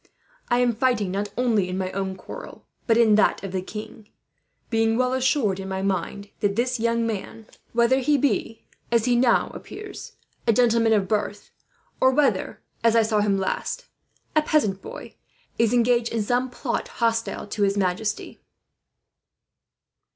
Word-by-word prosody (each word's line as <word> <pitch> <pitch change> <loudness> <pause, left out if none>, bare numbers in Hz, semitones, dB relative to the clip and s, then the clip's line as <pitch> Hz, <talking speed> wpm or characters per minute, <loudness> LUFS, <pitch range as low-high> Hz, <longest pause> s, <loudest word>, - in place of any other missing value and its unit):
"I 240 - +3
am 245 -1 +3
fighting 230 -5 +1
not 200 +2 -2
only 225 -7 +2
in 185 - -3
my 185 -1 -2
own 190 -1 -3
quarrel, 185 - -10 0.2
but 225 -1 +4
in 230 -2 +5
that - - +1
of 195 - -5
the 185 -1 -2
king; 210 +2 -9 0.6
being 225 0 +2
well 255 0 +1
assured 260 -7 +1
in 190 0 -6
my 190 0 -3
mind 195 +1 -2
that 200 -1 0
this 250 +1 0
young 230 0 +1
man, 225 0 -5 0.3
whether 235 +3 +3
he 290 +3 +2
be, 250 -4 -1 0.3
as 235 -1 +3
he 245 -1 +3
now 240 0 +3
appears, 415 -1 -9 0.3
a 230 - +5
gentleman 230 -1 +3
of 200 -3 +2
birth, 210 +1 -2 0.5
or 260 - +5
whether, 275 +1 +1 0.2
as 230 0 +4
I 230 - +5
saw 215 -1 +1
him 200 -1 +2
last, 335 - -2 0.5
a 310 - +5
peasant 215 -11 +1
boy, - - -10 0.4
is 230 -1 +3
engaged 240 -1 +2
in 225 -2 0
some 245 +4 0
plot 245 0 -3
hostile 230 -1 -1
to 210 - -4
his 200 0 +2
majesty." 200 +3 -2
225 Hz, 165 wpm, -24 LUFS, 200-245 Hz, 0.6 s, in